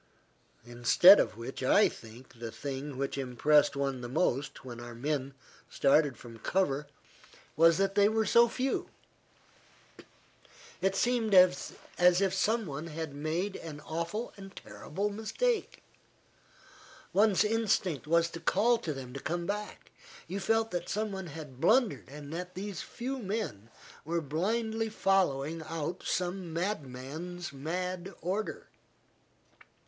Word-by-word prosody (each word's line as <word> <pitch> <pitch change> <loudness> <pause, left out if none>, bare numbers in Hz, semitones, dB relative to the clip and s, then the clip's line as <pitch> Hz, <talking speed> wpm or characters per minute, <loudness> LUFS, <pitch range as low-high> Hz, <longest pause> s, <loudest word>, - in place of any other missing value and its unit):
Instead 120 +11 +7
of - - 0
which 120 +4 -7
I 165 +11 +5
think 115 +2 -12
the 115 -1 -5
thing 135 +3 -5
which 140 +1 -2
impressed 140 +3 +3
one 135 -2 -2
the 120 - -6
most, 135 -2 -1
when 120 -2 -7
our 120 0 -8
men 135 +1 -2 0.3
started 140 -2 +3
from 115 -1 -12
cover, 150 - 0 0.7
was 165 +1 +6
that 195 0 +1
they 205 0 +5
were 220 0 +1
so 235 +4 +5
few. 260 +3 -2 1.9
It 195 0 +1
seemed 230 -2 +2
as 180 0 +5 0.3
if 180 +2 +4
some 220 +4 +1
one 150 0 -5
had 160 -2 -5
made 160 +7 -2
an 155 -3 -8
awful 170 +9 -4
and 195 -1 -11
terrible 150 - -4
mistake. 435 - -1 1.3
One's 205 -1 +4
instinct 210 -8 0
was 170 +1 +3
to 165 - -7
call 220 +8 +3
to 160 -9 -3
them 130 -2 -8
to 135 - -5
come 170 +4 -3
back. 205 +2 -5 0.4
You 190 +4 -3
felt 225 +3 +1
that 175 -1 -3
some 215 0 -1
one 190 -2 -5
had 150 -4 -9
blundered 220 - +3
and 145 +1 -9
that 180 +2 -6
these 195 -1 -5
few 260 +3 -5
men 195 - -4 0.3
were 170 +3 -1
blindly 220 +9 -1
following 165 -7 +1
out 160 +2 -4
some 180 -1 -2
madman's 165 0 -4
mad 180 +6 -4
order. 195 +6 -3
170 Hz, 135 wpm, -30 LUFS, 140-200 Hz, 1.9 s, Instead